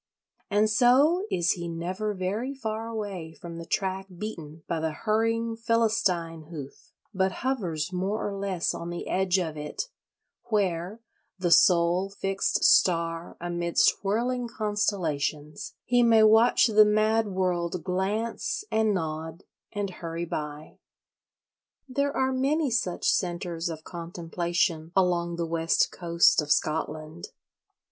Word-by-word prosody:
And 210 +2 +3
so 270 - +4
is 175 0 +2
he 175 -1 -3
never 185 +5 -3
very 210 +9 -3
far 225 -3 -4
away 200 -8 -5
from 170 0 -9
the 165 - -8
track 190 +1 -2
beaten 165 -7 -7
by 165 - -1
the 160 0 -1
hurrying 225 +4 0
Philistine 215 -8 0
hoof, 145 -5 -9 0.2
but 190 -1 +1
hovers 185 - -2
more 195 +5 -1
or 200 - -4
less 195 -3 -1
on 170 - -6
the 175 0 -5
edge 190 0 +1
of 165 -4 -2
it, 150 - -5 0.6
where, 195 0 -1 0.4
the 180 -2 -1
sole 175 +2 +4
fixed 195 0 -1
star 165 -1 +3
amidst 175 0 +2
whirling 240 +5 0
constellations, 175 -10 -2
he 245 0 +3
may 225 -2 +6
watch 220 +2 +6
the 215 -2 +6
mad 215 +1 +2
world 180 -3 -1
"glance, 195 - -2
and 220 -2 +2
nod, 160 0 -4 0.3
and 205 -2 -3
hurry 170 -1 -5
by." 150 -2 -6 1.1
There 280 +2 -1
are 265 0 +2
many 280 +2 +1
such 225 -7 -1
centres 175 -1 -1
of 160 -1 -7
contemplation 170 -1 -2
along 175 -2 +2
the 170 0 -2
West 165 0 +1
Coast 170 -2 +3
of 150 0 -4
Scotland. 155 +1 -1
185 Hz, 130 wpm, -27 LUFS, 170-215 Hz, 1.1 s, may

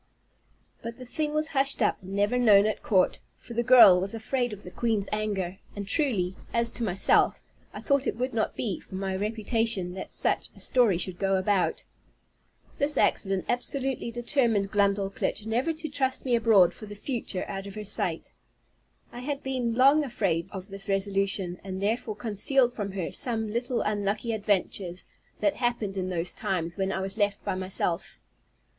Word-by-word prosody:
But 230 0 -7
the 255 - -9
thing 300 +4 -2
was 305 +1 -1
hushed 275 -1 +1
up, - - +1
and 190 +1 -9
never 205 +5 +2
known 210 -4 +6
at 215 - -1
court, 190 -3 +2 0.2
for 235 - -11
the 235 - +1
girl 240 -7 +8
was 195 +4 -3
afraid 245 +2 -1
of 205 -1 -8
the 180 - -9
queen's 215 -2 0
anger; 200 -4 -2 0.2
and 200 -1 -5
truly, 195 - 0 0.2
as 235 0 +2
to 240 - -4
myself, 190 -3 +3 0.3
I - - -8
thought 280 -2 +1
it - - -1
would 255 +1 -2
not 220 -1 -1
be 205 -6 -2
for 190 - -11
my 190 0 -2
reputation 215 -2 0
that 190 - -7
such - - -1
a - - -15
story 235 -8 +3
should 180 0 -4
go 195 -1 +1
about. 190 0 +1 1.0
This 290 +1 +5
accident 195 -2 +2
absolutely 260 +1 -1
determined 235 -4 0
Glumdalclitch 200 0 0
never 240 +8 0
to 315 0 -5
trust 270 -3 -1
me 250 - 0
abroad 220 -6 +5
for 215 - -11
the 205 - -8
future 220 -4 -3
out 195 0 -5
of 200 - -9
her 215 - -5
sight. 205 - -2 0.8
I 240 - -8
had 280 +2 -4
been 250 -3 -1
long 275 +5 +5
afraid 190 - -1
of 190 0 -8
this 195 +1 -7
resolution, 195 -2 0
and 190 -1 -5
therefore 215 +2 -1
concealed 240 +4 +1
from 200 -4 -4
her 185 -4 -3
some 220 -3 -2
little 240 +1 -1
unlucky 210 +2 -1
adventures, 195 -3 -1 0.4
that 305 - +1
happened 235 -5 -1
in 185 -1 -2
those 175 -1 -1
times 170 -2 -2
when 195 -1 -1
I 190 - -2
was 195 +3 -5
left 205 -1 0
by - - 0
myself. 185 -2 -2
210 Hz, 180 wpm, -27 LUFS, 195-245 Hz, 1.0 s, girl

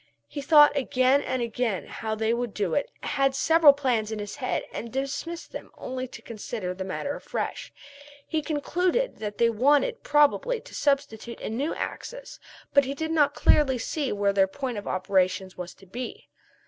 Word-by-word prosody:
He 285 - -6
thought 295 0 +7
again 260 0 +3
and 255 -3 -2
again 230 -4 -2
how 220 -1 -4
they 220 +1 +1
would 235 -2 -3
do 200 -5 -1
it 285 - 0
and - - -3
had 275 -1 +2
several 320 +1 +6
plans 250 -6 0
in 220 - -3
his 205 -1 -6
head 255 - -1
and 230 - -6
dismissed 285 +6 -4
them - - -8
only 255 0 -4
to - - -12
consider 215 -4 -5
the 190 +1 -5
matter 190 +9 -3
afresh. - - -4 0.6
He 315 -1 0
concluded 360 +10 0
that 205 -1 -5
they 235 0 +4
wanted 290 - +2
probably 295 +12 +3
to - - -15
substitute 240 -5 -1
a - - -5
new 275 +8 -1
axis, - - -6 0.3
but 280 -1 +5
he 275 +2 -3
did 320 +2 -3
not 290 -3 +3
clearly 270 -4 +4
see 275 +3 -2
where 200 -1 +1
their 195 -1 +4
point 245 +1 -4
of 205 - -10
operations 185 0 0
was 180 -1 -7
to 195 - -18
be. 240 +7 -7
255 Hz, 185 wpm, -26 LUFS, 215-290 Hz, 0.6 s, thought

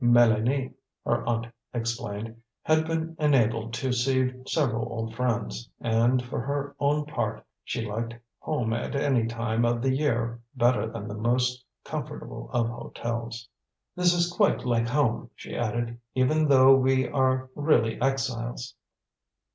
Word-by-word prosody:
Mélanie, 120 +2 +4 0.3
her - - +1
aunt 115 -1 0 0.3
explained, 115 -1 -4 0.2
had 155 0 +3
been 165 0 -2
enabled 115 -6 +2
to 130 +2 -1
see 130 +1 +2 0.2
several 120 -7 0
old 115 -1 -4
friends, 110 - -2
and, 120 +2 +2
for 120 - -3
her 140 +2 -3
own 145 +1 +2
part, 150 - -3 0.2
she 115 - -3
liked 115 +2 -3 0.2
home 125 -8 -1
at 120 +4 -3
any 135 -5 +2
time 115 0 -1
of 120 0 +2
the 130 +2 +1
year 120 -5 0
better 120 -2 +3
than 110 -2 -6
the 105 - -5
most 125 +3 0 0.2
comfortable - - -6
of 115 - +1
hotels. 115 0 -5 0.5
"This 180 -1 +4
is 175 0 +1
quite 205 - +2
like 120 -1 +2
home," 125 -2 +1
she - - -8
added, 120 +1 -2 0.2
"even 155 +5 +3
though 135 -1 +7
we 130 -1 +3
are 130 -2 +1
really 145 -7 +2
exiles." 125 -3 -1
120 Hz, 140 wpm, -27 LUFS, 115-135 Hz, 0.5 s, though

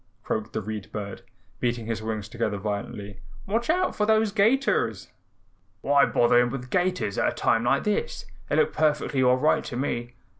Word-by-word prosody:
croaked 110 0 -3
the - - -2
Read 105 -1 -6
Bird, 100 -2 -6 0.4
beating 120 -2 -1
his 115 -1 -3
wings 110 -2 -4
together 110 -2 -2
violently. 100 0 -5 0.3
"Watch 230 +6 -1
out 365 +3 +1
for 210 - 0
those 220 -1 +3
'gators." 225 +7 +1 0.7
"Why 140 0 +4
bother 120 0 +4
him 120 0 +3
with 125 -1 -6
gaiters 180 - 0
at - - +2
a - - -10
time 115 +1 +1
like 135 +3 +2
this? 210 - -2 0.2
They - - +1
look 460 - +2
perfectly 150 -3 +1
all 125 0 +4
right 150 +4 +2
to 130 -5 -6
me." 120 -2 -3
120 Hz, 180 wpm, -26 LUFS, 110-185 Hz, 0.7 s, Why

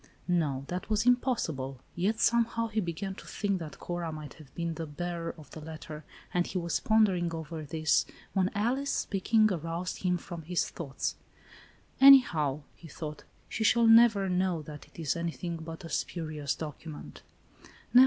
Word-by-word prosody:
No, 150 -7 +1
that 180 +5 -4
was 215 +1 +1
impossible; 165 - +1 0.2
yet, 200 +6 0
'somehow, 230 -1 +2
he 220 0 0
began 190 +1 -3
to - - -12
think 200 -3 -1
that 155 -4 -7
Cora 175 -2 -4
might 155 -2 -7
have 145 -4 -14
been 170 -1 -2
the 160 0 -5
bearer 170 +2 -4
of 150 -4 -14
the 155 - -8
letter, 155 0 -8 0.3
and 175 0 +2
he - - -3
was 170 -1 0
pondering 195 -6 +3
over 160 0 -5
this 155 +1 +1 0.3
when 190 -2 +2
Alice, 255 +7 0
speaking, 215 +1 +2
aroused 165 +2 -3
him 180 -1 +1
from 175 -1 -8
his 170 +2 0
thoughts. 140 -5 -4 0.8
"Anyhow," 165 - +7
he 170 - -13
thought, 150 0 -7 0.2
"she 220 - -2
shall 235 +1 +5
never 225 -3 +7
know 180 -3 0
that 150 0 -10
it - - -21
is 160 -1 0
anything 170 0 -3
but 165 +2 -8
a - - -7
spurious 155 -5 -2
document." 155 0 -8
170 Hz, 165 wpm, -30 LUFS, 155-200 Hz, 0.8 s, Anyhow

